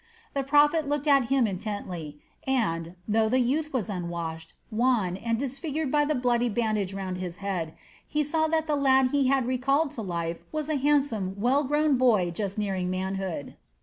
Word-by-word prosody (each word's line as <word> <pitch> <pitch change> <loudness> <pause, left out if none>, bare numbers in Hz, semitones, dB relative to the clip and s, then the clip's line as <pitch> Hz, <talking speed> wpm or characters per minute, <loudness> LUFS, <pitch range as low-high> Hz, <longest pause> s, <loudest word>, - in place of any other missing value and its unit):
The 275 - 0
prophet 295 +2 +3
looked 290 0 -1
at 275 -4 +5
him 265 0 +2
intently 185 -6 -5 0.3
and, 175 -10 0
though 220 +1 +2
the 255 +3 +3
youth 295 +5 0
was 245 -7 -1
unwashed, 170 -4 -5 0.2
wan, 220 -5 +1
and 230 +4 -1
disfigured 280 +3 -3
by 295 -1 +3
the 305 +1 0
bloody 245 -1 +1
bandage 215 -3 0
round 190 -2 -4
his 180 -1 -5
head, 185 -5 -3 0.3
he 300 0 0
saw 315 +2 +1
that 320 0 +1
the 305 -2 0
lad 265 -2 +4
he 280 -2 +2
had 265 -1 +2
recalled 275 +4 +1
to 230 - -6
life 170 -4 -3
was 310 -1 -3
a 310 - +1
handsome, 270 -9 +1
well 260 +7 +3
grown 295 0 +2
boy 215 -9 +3
just 200 +3 -3
nearing 190 -3 -1
manhood. 190 -4 -3
240 Hz, 180 wpm, -27 LUFS, 190-280 Hz, 0.3 s, at